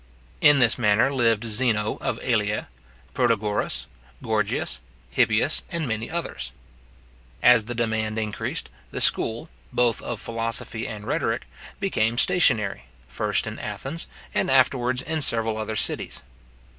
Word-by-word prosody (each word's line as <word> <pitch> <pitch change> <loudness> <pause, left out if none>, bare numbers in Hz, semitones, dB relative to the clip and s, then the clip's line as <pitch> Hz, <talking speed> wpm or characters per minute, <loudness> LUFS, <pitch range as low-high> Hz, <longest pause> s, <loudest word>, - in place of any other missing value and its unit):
In 145 -1 +6
this 120 -4 +4
manner 110 +4 +3
lived 115 -4 +2
Zeno 110 -1 +1
of - - -2
Elea, 105 - -1 0.4
Protagoras, 105 -2 0 0.4
Gorgias, - - -1 0.3
Hippias, - - +2
and 165 -4 -3
many 110 0 -3
others. 65 - -5 0.9
As 120 -3 +6
the 120 +2 -5
demand 110 -1 -1
increased, 105 -1 -3 0.2
the - - -5
school, 115 +8 +4 0.2
both 120 -2 +1
of 120 -3 -5
philosophy 115 0 -2
and 105 -1 -7
rhetoric, - - -1 0.3
became 120 - 0
stationary, 110 - +3 0.2
first 65 - -1
in - - -6
Athens, 160 +5 -5 0.3
and - - 0
afterwards 130 -1 +2
in 155 0 -3
several 115 -4 +4
other 110 0 -4
cities. - - 0
115 Hz, 125 wpm, -24 LUFS, 110-125 Hz, 0.9 s, In